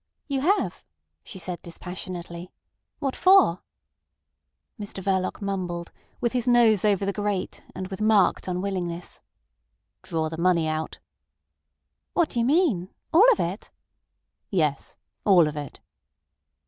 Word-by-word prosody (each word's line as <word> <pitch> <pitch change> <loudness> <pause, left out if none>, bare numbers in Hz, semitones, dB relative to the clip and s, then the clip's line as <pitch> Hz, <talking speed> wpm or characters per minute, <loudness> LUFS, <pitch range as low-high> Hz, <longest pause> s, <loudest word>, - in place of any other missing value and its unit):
"You 275 -3 -1
have!" 385 +8 +1 0.4
she - - -9
said 180 -1 -5
dispassionately. 175 0 -7 0.5
"What 275 -3 -2
for?" 365 - +5 1.2
Mr 205 -2 -6
Verloc 190 +1 -1
mumbled, 180 -3 -3 0.3
with 240 -2 0
his 250 -1 -1
nose 235 -5 +5
over 200 -2 +2
the 200 - -1
grate, 205 -2 -3
and 185 - -4
with 190 +1 -6
marked 215 -4 +3
unwillingness. 180 -2 -3 0.8
"Draw 160 -1 -2
the 160 +1 -6
money 170 -2 +3
out!" 155 0 -3 1.2
"What 340 -3 +2
do 240 - -2
you 230 - +2
mean? 265 - +2 0.2
All 430 +10 +8
of 455 - +1
it?" 180 +5 -3 0.8
"Yes. 155 -7 -1 0.3
All 175 -5 +6
of 150 - -4
it." 145 -2 -7
190 Hz, 125 wpm, -25 LUFS, 175-230 Hz, 1.2 s, All